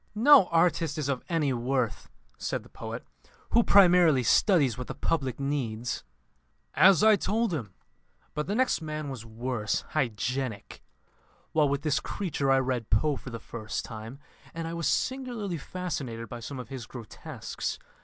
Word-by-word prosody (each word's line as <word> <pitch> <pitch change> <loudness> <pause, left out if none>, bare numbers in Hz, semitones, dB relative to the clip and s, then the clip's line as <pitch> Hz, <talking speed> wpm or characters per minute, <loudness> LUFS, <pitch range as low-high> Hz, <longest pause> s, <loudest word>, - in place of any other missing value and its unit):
"No 260 -1 +7
artist 165 -2 +2
is 145 -3 -2
of 135 -3 -1
any 155 -6 +1
worth," 120 -2 -1 0.3
said - - -2
the - - -17
poet, - - -7 0.5
"who 235 - +6
primarily 180 - +6
studies 140 - +4
what 125 +1 -6
the - - -6
public 135 -7 -1
needs." 125 -5 -2 0.7
"As 195 -3 +6
I 220 -1 +7
told 215 0 0
him. 110 - -5 0.6
But 150 - -3
the 205 - -1
next 255 -6 +2
man 155 -2 -4
was 120 -4 -7
worse 115 -1 -2
hygienic. 125 -3 -2 0.7
While 150 -3 +3
with 140 +1 -1
this 150 -3 +2
creature 165 -8 -2
I 135 - +5
read 125 -4 -1
Poe 145 +8 +2
for 130 - -8
the 115 -1 -6
first 110 -1 -5
time, 110 +3 -8 0.4
and 165 0 -3
I 165 - -4
was 170 -1 -1
singularly 240 - -1
fascinated 140 -10 -5
by 120 - -7
some 135 +4 -7
of 125 - -7
his 130 -5 -7
grotesques. 120 -5 -6
140 Hz, 160 wpm, -28 LUFS, 120-170 Hz, 0.7 s, No